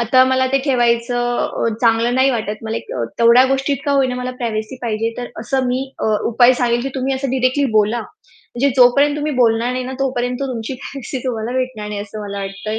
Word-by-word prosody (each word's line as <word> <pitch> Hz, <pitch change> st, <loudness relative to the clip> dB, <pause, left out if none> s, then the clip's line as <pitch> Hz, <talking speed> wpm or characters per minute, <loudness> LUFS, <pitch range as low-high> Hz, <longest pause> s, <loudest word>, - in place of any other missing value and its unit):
आता 250 Hz, +3 st, +4 dB
मला 260 Hz, 0 st, +2 dB
ते 275 Hz, -, +4 dB
ठेवायचं 240 Hz, -2 st, 0 dB
चांगलं 230 Hz, +1 st, +2 dB
नाही 265 Hz, +1 st, +4 dB
वाटत. 215 Hz, -4 st, -2 dB
मला 220 Hz, +1 st, -2 dB, 0.4 s
तेवढ्या 235 Hz, +2 st, +6 dB
गोष्टीत 270 Hz, +1 st, 0 dB
का 285 Hz, -, +2 dB
होईना 265 Hz, -2 st, +2 dB
मला 250 Hz, 0 st, -3 dB
प्रायव्हसी 220 Hz, +1 st, -3 dB
पाहिजे." 225 Hz, 0 st, -1 dB
तर 245 Hz, -, -4 dB
असं 255 Hz, +3 st, -1 dB
मी 250 Hz, +1 st, 0 dB, 0.2 s
अ, -, -, -3 dB, 0.3 s
उपाय 245 Hz, +2 st, +6 dB
सांगेल, 240 Hz, 0 st, +2 dB
की 270 Hz, -, -2 dB
तुम्ही 265 Hz, 0 st, -1 dB
असं 265 Hz, -1 st, -3 dB
डायरेक्टली 260 Hz, +2 st, +1 dB
बोला. 215 Hz, +3 st, +1 dB, 0.5 s
म्हणजे 260 Hz, +4 st, +2 dB
जोपर्यंत 280 Hz, +4 st, +5 dB
तुम्ही 300 Hz, 0 st, -2 dB
बोलणार 235 Hz, 0 st, +2 dB
नाही 255 Hz, 0 st, -3 dB
ना, 260 Hz, -, -5 dB
तोपर्यंत 250 Hz, -1 st, -1 dB
तुमची 255 Hz, -2 st, -4 dB
प्रायव्हसी 270 Hz, +1 st, -6 dB
तुम्हाला 235 Hz, -2 st, -3 dB
भेटणार 240 Hz, -5 st, -3 dB
नाही, 210 Hz, -1 st, -4 dB
असं 215 Hz, +1 st, -7 dB
मला 200 Hz, 0 st, -5 dB
वाटतंय. 195 Hz, +2 st, -4 dB
245 Hz, 190 wpm, -18 LUFS, 230-260 Hz, 0.5 s, तेवढ्या